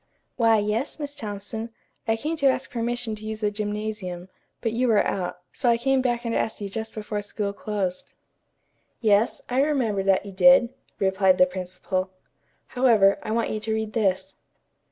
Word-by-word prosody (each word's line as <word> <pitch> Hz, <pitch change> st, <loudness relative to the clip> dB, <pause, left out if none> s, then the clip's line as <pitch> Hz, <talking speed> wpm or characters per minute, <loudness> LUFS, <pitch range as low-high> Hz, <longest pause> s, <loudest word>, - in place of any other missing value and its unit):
"Why, 225 Hz, -2 st, +4 dB
yes, 210 Hz, +6 st, -1 dB
Miss 290 Hz, -2 st, -5 dB
Thompson. 220 Hz, -1 st, -5 dB, 0.4 s
I 225 Hz, -, +3 dB
came 310 Hz, +8 st, -2 dB
to 280 Hz, -, +3 dB
ask 260 Hz, -1 st, 0 dB
permission 240 Hz, -2 st, -2 dB
to 215 Hz, 0 st, -8 dB
use 220 Hz, 0 st, -5 dB
the 210 Hz, -1 st, +1 dB
gymnasium, 205 Hz, -4 st, -4 dB, 0.3 s
but 225 Hz, -, -1 dB
you 245 Hz, +3 st, +1 dB
were 220 Hz, -3 st, +4 dB
out, 180 Hz, -2 st, -3 dB
so 245 Hz, -, +1 dB
I 235 Hz, -, +4 dB
came 265 Hz, +2 st, +2 dB
back 240 Hz, -1 st, -1 dB
and 230 Hz, -, -1 dB
asked 225 Hz, -, -1 dB
you 200 Hz, -1 st, -4 dB
just 220 Hz, +2 st, -5 dB
before 210 Hz, -1 st, -3 dB
school 205 Hz, 0 st, -3 dB
closed." 200 Hz, -4 st, -3 dB, 0.9 s
"Yes, 215 Hz, 0 st, +2 dB
I 255 Hz, +2 st, +2 dB
remember 255 Hz, -9 st, +1 dB
that 195 Hz, 0 st, +2 dB
you 200 Hz, -, -7 dB
did," 245 Hz, +5 st, +6 dB, 0.3 s
replied 190 Hz, -1 st, +3 dB
the 180 Hz, -, +7 dB
principal. 185 Hz, +1 st, -3 dB, 0.6 s
"However, 225 Hz, -6 st, +4 dB
I -, -, -6 dB
want 230 Hz, +1 st, 0 dB
you 215 Hz, -, -2 dB
to 220 Hz, +1 st, -2 dB
read 220 Hz, -1 st, -3 dB
this." 195 Hz, -5 st, 0 dB
215 Hz, 175 wpm, -25 LUFS, 200-235 Hz, 0.9 s, the